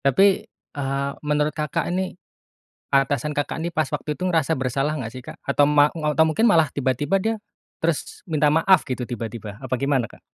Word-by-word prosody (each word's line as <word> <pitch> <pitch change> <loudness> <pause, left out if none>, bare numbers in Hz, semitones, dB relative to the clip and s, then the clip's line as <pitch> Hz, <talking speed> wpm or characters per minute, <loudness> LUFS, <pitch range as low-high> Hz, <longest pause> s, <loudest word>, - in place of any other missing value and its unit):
Tapi, 140 +8 +5 0.2
eee, 140 -4 -4
menurut 150 0 +1
Kakak 150 -2 -2
ini, 185 0 -2 0.8
atasan 140 +1 +2
Kakak 145 -1 -2
ini 170 +1 -3
pas 155 -4 0
waktu 150 - -3
itu 180 - -7
ngerasa 165 -4 +2
bersalah 135 +2 -1
enggak 120 -7 -4
sih 130 - -7
Kak? - - -9
Atau 140 +1 +3
ma 145 0 +5
atau 155 0 +1
mungkin 220 +9 +2
malah 165 - +5
tiba-tiba 140 +6 0
dia 220 +4 0 0.5
terus 165 -2 -2
minta 150 -2 +3
maaf 165 +3 +5
gitu 125 -1 -2
tiba-tiba, 115 -3 -6
apa 130 -1 -4
gimana, 135 -2 +1
Kak? - - -17
145 Hz, 180 wpm, -23 LUFS, 135-160 Hz, 0.8 s, Tapi